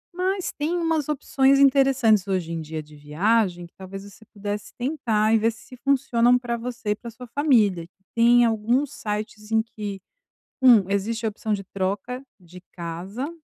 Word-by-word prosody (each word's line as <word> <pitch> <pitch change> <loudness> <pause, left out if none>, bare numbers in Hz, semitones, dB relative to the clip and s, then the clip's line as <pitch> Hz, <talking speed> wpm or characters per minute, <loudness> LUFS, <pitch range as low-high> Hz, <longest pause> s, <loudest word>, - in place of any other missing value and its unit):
Mas 375 +1 -1
têm 320 +4 -2
umas 325 -3 0
opções 275 -1 +2
interessantes, 265 -7 +4
hoje 185 -4 -1
em 165 -1 -3
dia, 155 0 -6
de 150 0 -17
viagem 175 +5 0
que, 170 - -18
talvez, 195 +1 -9
você 205 +2 -15
pudesse 205 0 -6
tentar 235 -5 0
e 225 - +5
ver 225 +2 +2
se 230 +3 -14
funcionam 250 -3 +3
pra 240 -1 -3
você 235 -2 -5
e 210 - +2
pra 235 +2 -9
sua 240 +3 -11
família. 220 - +2 0.3
Tem 240 +1 +5
alguns 235 +5 +1
sites 210 0 -5
em 220 0 +3
que: 205 -3 -7 0.6
1 230 -7 +6
existe 220 +3 -1
a - - +2
opção 215 +1 -4
de 200 -1 -1
troca 195 +6 -3 0.2
de 180 +1 -14
casa, 185 - -5
220 Hz, 170 wpm, -24 LUFS, 195-250 Hz, 0.6 s, 1